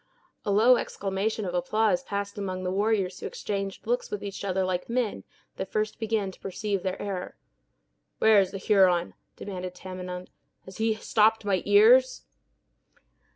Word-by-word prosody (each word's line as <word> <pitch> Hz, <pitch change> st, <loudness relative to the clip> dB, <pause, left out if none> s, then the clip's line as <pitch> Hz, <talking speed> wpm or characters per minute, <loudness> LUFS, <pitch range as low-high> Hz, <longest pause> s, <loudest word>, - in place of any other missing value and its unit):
A -, -, -3 dB
low 225 Hz, +5 st, +6 dB
exclamation 200 Hz, +2 st, -2 dB
of 180 Hz, -, -4 dB
applause 215 Hz, +8 st, +1 dB
passed 200 Hz, -5 st, -4 dB
among 185 Hz, -2 st, -4 dB
the 180 Hz, -, -1 dB
warriors 200 Hz, -2 st, 0 dB
who -, -, -4 dB
exchanged 195 Hz, -1 st, -4 dB
looks 240 Hz, +2 st, -1 dB
with 210 Hz, -, -5 dB
each 200 Hz, -1 st, -6 dB
other 190 Hz, -1 st, 0 dB
like 185 Hz, +1 st, -2 dB
men 235 Hz, -3 st, -1 dB, 0.3 s
that 190 Hz, -, -5 dB
first 215 Hz, 0 st, -1 dB
began 220 Hz, -3 st, -1 dB
to -, -, -18 dB
perceive 195 Hz, 0 st, -3 dB
their 185 Hz, 0 st, -3 dB
error. 190 Hz, -3 st, -5 dB, 0.8 s
"Where 220 Hz, -2 st, +6 dB
is 190 Hz, -2 st, +2 dB
the 195 Hz, -, -6 dB
Huron?" 185 Hz, -3 st, +3 dB, 0.2 s
demanded 185 Hz, -2 st, -6 dB
Tamenund. 180 Hz, 0 st, -7 dB, 0.3 s
"Has 190 Hz, 0 st, -11 dB
he 220 Hz, 0 st, +1 dB
stopped 220 Hz, 0 st, +2 dB
my 190 Hz, -3 st, +1 dB
ears?" 230 Hz, +6 st, +5 dB
200 Hz, 155 wpm, -27 LUFS, 185-215 Hz, 0.8 s, low